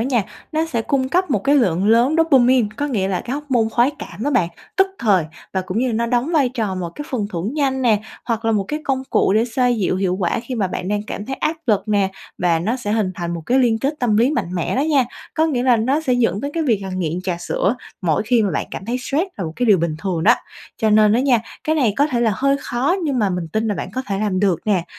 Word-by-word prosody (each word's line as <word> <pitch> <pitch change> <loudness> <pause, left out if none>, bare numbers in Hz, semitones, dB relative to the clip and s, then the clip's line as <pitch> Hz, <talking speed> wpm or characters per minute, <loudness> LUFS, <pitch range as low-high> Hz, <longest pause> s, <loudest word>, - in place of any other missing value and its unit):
nha, 240 -2 +1 0.3
nó 315 +1 0
sẽ 235 -8 -2
cung 260 +1 0
cấp 360 +2 +1
một 205 -6 0
cái 280 +1 +4
lượng 190 -6 +2
lớn 235 +6 +4
dopamine, 260 -7 +4
có 290 - -1
nghĩa 205 -9 -1
là 185 -2 -1
cái 250 - -4
hóc 295 +1 -5
môn 230 -3 +2
khoái 240 +4 +3
cảm 220 - -8
đó 290 - 0
bạn, 220 -11 +2 0.3
tức 385 0 +5
thời 195 -7 +3 0.3
và 190 - 0
cũng 185 +3 -3
như 255 - +1
là 240 - -1
nó 235 +1 0
đóng 245 +7 0
vai 285 -6 +3
trò 220 -6 -2
một 180 -2 -3
cái 295 - -6
phần 225 -6 -1
thưởng 190 - -3
nhanh 270 -3 0
nè, 220 -4 +3 0.2
hoặc 230 -1 -2
là 225 - +2
một 205 -2 +1
cái 300 +1 -2
công 265 -1 0
cụ - - +3
để 220 +3 +3
xoa 250 +1 +1
dịu 210 -6 +1
hiệu 185 -1 0
quả 190 +3 -1
khi 255 +1 -5
mà 205 -5 0
bạn 180 0 -4
đang 205 0 -1
cảm 210 0 -6
thấy 270 - -3
áp 320 +1 -1
lực 205 -2 +1
nè, 200 -2 +2 0.3
và 170 -2 +2
nó 215 +9 -1
sẽ 210 -5 -3
hình 210 -4 0
thành 170 0 -4
một 165 - -6
cái 255 - +3
liên 235 -4 +3
kết 275 +5 -1
tâm 225 -4 +2
lý 240 +5 +4
mạnh 185 - -2
mẽ 175 - -1
đó 270 - +2
nha, 290 -4 +3 0.3
có 320 0 +2
nghĩa 255 -6 0
là 250 -2 +4
nó 260 +7 +1
sẽ 265 -5 0
dẫn 230 -5 +1
tới 285 - -3
cái 330 - 0
việc 235 -8 +2
là 190 - -5
nghiện 180 -2 -2
trà 180 -2 -2
sữa 185 +5 0 0.3
mỗi 160 -1 +1
khi 235 -1 +3
mà 200 - 0
bạn 155 - -2
cảm - - -6
thấy 240 +4 -2
stress 285 +7 -1
là 195 - -3
một 160 - -5
cái 245 - 0
điều 205 -4 +5
bình 165 -2 -1
thường 175 -3 -2
đó. 230 +6 +6 0.4
Cho 220 -2 +2
nên 210 0 +5
đó 235 - +3
nha, 255 -3 +3 0.2
cái 315 - +1
này 250 -9 +2
có 285 +2 +3
thể 250 -5 -1
là 225 -2 +2
hơi 275 +1 +2
khó 260 +8 0
nhưng 275 -4 0
mà 205 -3 +2
mình 180 -2 -3
tin 220 +5 -1
là 205 - 0
bạn - - -4
có 260 - -2
thể 195 -1 -2
làm 205 -3 0
được 185 -5 +2
nè, 190 -5 +2
230 Hz, 290 wpm, -20 LUFS, 195-260 Hz, 0.4 s, đó